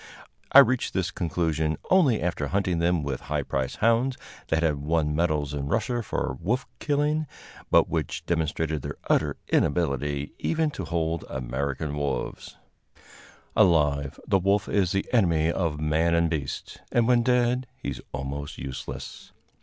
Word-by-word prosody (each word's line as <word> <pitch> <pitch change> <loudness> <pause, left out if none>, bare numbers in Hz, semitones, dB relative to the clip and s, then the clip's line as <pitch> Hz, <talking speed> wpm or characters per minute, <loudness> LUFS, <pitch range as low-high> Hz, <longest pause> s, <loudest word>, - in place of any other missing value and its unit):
I - - +7
reached 130 -2 +5
this 95 -1 0
conclusion 80 -3 -1
only 150 - +4
after 85 -4 -1
hunting 95 -1 0
them 85 -1 +2
with 70 -3 -3
high 75 -1 0
priced 65 -1 -2
hounds, 120 +3 +3 0.3
that 80 +1 +1
had 75 -3 +2
won 75 +1 0
medals 75 -3 0
in 70 -1 -3
Russia 120 - 0
for 65 - -3
wolf 120 +9 0
killing, 150 +1 0 0.4
but - - +5
which - - -3
demonstrated 80 -2 -1
their - - -6
utter - - +2
inability 70 -2 0
even 160 -2 0
to 95 - -5
hold 80 0 -1
American 70 +3 -3
wolves. 70 -4 -3 1.0
Alive, 75 -5 +3
the 100 -2 +3
wolf 100 +2 +1
is 95 -4 +1
the 95 - 0
enemy 85 -8 +3
of 85 -4 -1
man 80 +2 +2
and 85 0 +2
beast, 70 -4 -4
and 120 -1 +3
when 125 -1 +5
dead 125 +1 +2
he - - -5
is - - -7
almost 70 +2 -5
useless. 65 0 -7
80 Hz, 150 wpm, -26 LUFS, 75-100 Hz, 1.0 s, I